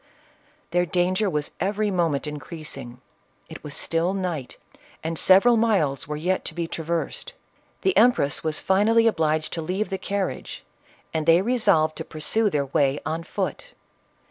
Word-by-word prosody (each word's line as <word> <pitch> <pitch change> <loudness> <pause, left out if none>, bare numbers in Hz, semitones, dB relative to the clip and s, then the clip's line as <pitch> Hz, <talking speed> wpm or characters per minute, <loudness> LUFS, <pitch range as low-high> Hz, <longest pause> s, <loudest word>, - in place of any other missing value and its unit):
Their 175 +1 +2
danger 185 +4 +1
was 150 -4 -2
every 205 +3 0
moment 165 -6 0
increasing 150 -5 -7 0.5
• 150 - -9
still 165 +5 0
night, 175 -9 -4 0.5
and 160 0 -1
several 215 +6 +6
miles 190 - +1
were 150 - -3
yet 180 +4 -1
to 155 - -5
be 170 -1 -2
trav: 165 -1 -6
ersed; 170 - -2 0.5
the 385 - +2
empress 220 - +3
was 155 -1 0
finally 220 +4 +3
obliged 160 -7 +1
to 165 - -2
leave 190 +6 -2
the 190 - -2
carriage, 200 -1 -4 0.5
and 160 -1 -2
they 165 +3 +6
resolved 200 -10 +2
to - - -4
pursue 205 +8 +1
their 145 -6 0
way 140 +1 +1
on 160 +2 -2
foot. - - -5
170 Hz, 150 wpm, -24 LUFS, 155-200 Hz, 0.5 s, several